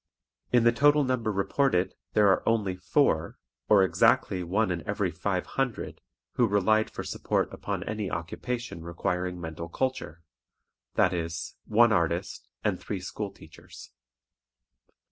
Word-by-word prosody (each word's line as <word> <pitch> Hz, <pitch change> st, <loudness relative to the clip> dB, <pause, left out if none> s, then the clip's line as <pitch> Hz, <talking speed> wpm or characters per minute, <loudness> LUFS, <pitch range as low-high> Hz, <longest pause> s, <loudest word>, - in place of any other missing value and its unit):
In 120 Hz, -2 st, +4 dB
the 120 Hz, -, +6 dB
total 145 Hz, +4 st, +4 dB
number 125 Hz, -4 st, 0 dB
reported 100 Hz, -1 st, +1 dB, 0.2 s
there 105 Hz, -1 st, +5 dB
are 95 Hz, -, +3 dB
only 105 Hz, -5 st, +1 dB
four, 90 Hz, -1 st, +1 dB, 0.3 s
or 100 Hz, -2 st, +6 dB
exactly 95 Hz, 0 st, +3 dB
one 95 Hz, +4 st, 0 dB
in 85 Hz, -2 st, -2 dB
every 100 Hz, -3 st, 0 dB
five 90 Hz, +2 st, -2 dB
hundred, 130 Hz, -5 st, -3 dB, 0.3 s
who 120 Hz, -, +2 dB
relied 110 Hz, +2 st, +2 dB
for -, -, -6 dB
support -, -, -1 dB
upon -, -, -4 dB
any 105 Hz, -2 st, -3 dB
occupation 85 Hz, +4 st, -4 dB
requiring 90 Hz, +2 st, -3 dB
mental 85 Hz, 0 st, -6 dB
culture, 105 Hz, -, -3 dB, 0.7 s
that 90 Hz, -, +3 dB
is, 85 Hz, -1 st, -4 dB
one 115 Hz, +2 st, +5 dB
artist 85 Hz, -2 st, -1 dB
and -, -, 0 dB
three 100 Hz, -, -4 dB
school 100 Hz, +3 st, -5 dB
teachers. 95 Hz, -, -14 dB
100 Hz, 135 wpm, -28 LUFS, 90-115 Hz, 0.7 s, the